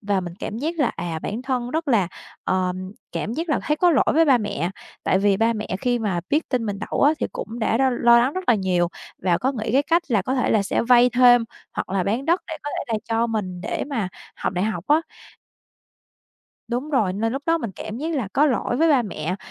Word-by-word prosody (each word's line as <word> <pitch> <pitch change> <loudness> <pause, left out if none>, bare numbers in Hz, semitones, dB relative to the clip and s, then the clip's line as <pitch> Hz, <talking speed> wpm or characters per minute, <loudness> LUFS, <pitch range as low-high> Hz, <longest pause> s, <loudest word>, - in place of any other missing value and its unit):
Và 200 -2 0
mình 175 -1 -7
cảm 220 +1 -5
giác 320 +5 -2
là, 280 - +3
à, 165 -2 -3
bản 225 +5 -4
thân 250 -2 -2
rất 320 +1 -2
là, 205 -9 +3 0.4
ờm, 185 +1 -1 0.2
cảm 215 - -3
giác 325 +6 -3
là 300 - +2
thấy 300 - 0
có 350 +2 +4
lỗi 275 - +3
với 325 +1 +5
ba 270 -5 +5
mẹ. 200 -5 -2 0.3
Tại 190 - +3
vì 200 -1 +3
ba 225 +2 +2
mẹ 215 -1 -4
khi 245 -1 +1
mà 195 -6 -1
biết 300 +3 +1
tin 245 -4 -1
mình 200 -1 -3
đậu - - 0
á 290 +2 +6
thì - - 0
cũng 230 +2 -6
đã 225 0 +1
r - - +1
lo 265 -1 +4
lo 235 -1 +5
lắng 250 +4 +2
rất 370 +2 -4
là 240 - +6
nhiều 185 -4 +1 0.3
và 175 -2 +2
có 265 +2 0
nghĩ 220 -3 -3
cái 275 +3 +4
cách 335 +3 +2
là 220 -6 +2
có 255 +7 -1
thể 250 - +1
là 215 -2 +3
sẽ - - 0
vay 245 +1 +5
thêm, 245 -2 +6 0.3
hoặc - - -4
là 190 -1 +1
bán 225 +8 -1
đất 340 +3 +2
để 325 - -5
có 290 - -4
thể - - -3
là 215 - +1
cho 230 +1 +1
mình 190 -6 -3
để 200 - -3
mà 225 -10 -2 0.3
học - - -2
đại 185 +2 0
học 220 - -3
á. 300 +2 +5 1.7
Đúng 250 +6 -3
rồi, 215 -10 +2
nên 225 +3 -1
lúc 275 +2 -3
đó 330 0 +3
mình 230 -9 -4
cảm 215 - -6
giác 320 +2 -2
là 240 -8 -2
có 295 +2 +4
lỗi 245 -2 0
với 325 +3 +3
ba 275 -6 +4
mẹ, 180 -3 -4
235 Hz, 255 wpm, -23 LUFS, 200-275 Hz, 1.7 s, á